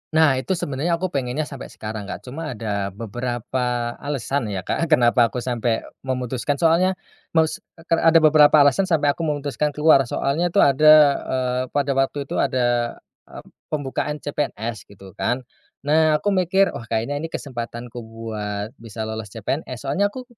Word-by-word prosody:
Nah, 155 -5 +4
itu 185 +8 -1
sebenarnya 155 +3 -1
aku 185 +1 -3
pengennya 135 +2 -1
sampai 140 -3 -8
sekarang 105 -2 -7
Kak. - - -7
Cuma 140 0 -6
ada 100 -3 -2
beberapa 120 +2 -2
alasan 140 -3 -2
ya 95 -3 -4
Kak, 165 +9 -1
kenapa 120 -5 +4
aku 125 +1 -5
sampe 120 -2 -1 0.2
memutuskan, 130 +1 -2
soalnya 170 +5 +3 0.4
mos 160 -1 +2 0.2
eee, 165 - -16
kar 165 -1 +1
ada 165 - +5
beberapa 155 0 +6
alasan 145 +7 +3
sampai 150 -5 +3
aku 165 +2 -3
memutuskan 145 0 -2
keluar, 150 -4 +5
soalnya 155 +9 0
tuh 170 - +3
ada 155 +3 +6 0.3
eee, 125 -1 -1
pada 140 -1 +1
waktu 135 +1 0
itu - - -4
ada, 120 -3 +1 0.3
eee, - - -11 0.2
pembukaan 150 0 -2
CPNS 120 -6 -4
gitu 95 -1 -14
kan. 125 +6 -2 0.4
Nah 155 +1 +3
aku 200 +7 0
mikir, 190 +1 +2
"Oh 115 -1 -8
kayaknya 115 +6 -1
ini 165 - -4
kesempatanku 120 -4 -6
buat 110 -2 -5
bisa 110 -1 -7
lolos 110 0 -5
CPNS." 120 +5 -5
Soalnya 165 +9 +1
aku 255 +5 -8
135 Hz, 160 wpm, -22 LUFS, 120-155 Hz, 0.4 s, beberapa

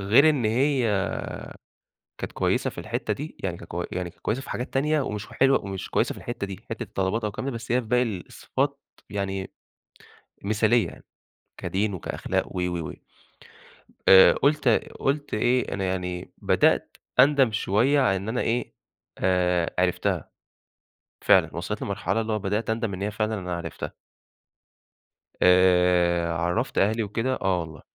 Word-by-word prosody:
غير 115 +11 +5
إن 140 -6 0
هي 115 -4 +2 1.1
كانت - - -5
كويسة - - 0
في - - -14
الحِتّة - - -2
دي، 150 +3 -7
يعني 90 -3 -2
كانت 85 - -12
كو 85 +1 -2
يعني 90 -1 -3
كانت - - -22
كويسة 120 +5 -1
في - - -11
حاجات 125 - -4
تانية 150 +3 +2
ومش 105 -5 -4
حلوة 135 -5 +2
ومش 95 -1 -5
كويسة - - +1
في - - -14
الحِتّة 120 -4 -4
دي، 95 -2 -9
حِتّة - - -4
الطلبات 95 +4 -1
أو 105 - 0
الكلام 120 +6 -5
ده، 135 - -5
بس 115 - -6
هي 125 +1 +3
في 115 - -12
باقي 125 +2 +3
الصفات، 130 +7 -3 0.3
يعني 95 -2 -3 0.9
مثالية 110 +3 +3
يعني، - - -13 0.5
كدين 100 +1 -1
وكأخلاق 90 - -2
و، - - 0
و، 90 -3 -2
و، - - -6 1.2
آآ 95 0 +9
قُلت 145 -1 +2 0.3
قُلت 145 +1 -1
إيه 120 +4 +1
أنا 95 - -2
يعني 90 -1 -3
بدأت - - +2 0.2
أندم 135 -3 +5
شوية 115 +7 +2
على 100 -8 +3
إن 95 +3 -5
أنا 120 +2 -1
إيه 120 +2 -1 0.4
آآ 90 -2 +1
عرفتها. 90 -1 0 0.9
فعلًا - - +4
وصلت - - -4
لمرحلة، 115 +3 -1
اللي 110 0 -2
هو 105 - 0
بدأت 105 +3 -2
أندم 110 -2 -1
إن 95 - -6
هي 105 +1 -1
فعلًا 110 +1 -1
أنا 90 -1 -4
عرفتها. 85 - -6 1.5
آآ 90 -2 +4
عَرّفت 85 +9 -1
أهلي 110 +3 +2
وكده 115 +5 -1
آه 95 -2 +2
والله. 80 -1 -8
105 Hz, 160 wpm, -25 LUFS, 90-120 Hz, 1.5 s, آآ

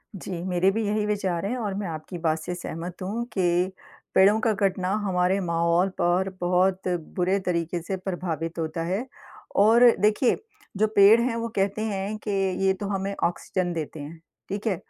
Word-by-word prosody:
जी, 190 0 -7
मेरे 185 0 +2
भी 220 +1 -1
यही 210 0 0
विचार 195 -4 -1
हैं 245 +5 -2
और 210 -4 -2
मैं 200 -1 -3
आपकी 160 +2 -6
बात 160 0 +2
से 180 +3 -5
सहमत 175 +1 -7
हूँ 210 +6 -2
कि 180 0 +1 0.4
पेड़ों 205 +3 +6
का 225 -1 +2
कटना 190 -2 0 0.2
हमारे 185 0 +1
माहौल 170 +1 +2
पर 180 +2 +2
बहुत 185 +1 +1 0.3
बुरे 185 +2 +1
तरीके 170 -1 -1
से 190 +3 -4
प्रभावित 170 -3 -4
होता 160 +1 -2
है। 195 +8 -2 0.6
और 230 +3 +6
देखिए, 215 +5 +3 0.4
जो 215 +2 +3
पेड़ 205 +3 +8
हैं, 235 -1 0
वो 230 0 -2
कहते 200 +2 0
हैं 205 0 -3
कि 205 - 0 0.3
ये 190 - +4
तो 195 +1 -5
हमें 195 0 -2
ऑक्सीजन 175 +1 -1
देते 160 -1 -5
हैं। 155 +3 -8 0.3
ठीक 205 +3 -3
है? 195 - +2
190 Hz, 175 wpm, -25 LUFS, 175-205 Hz, 0.6 s, पेड़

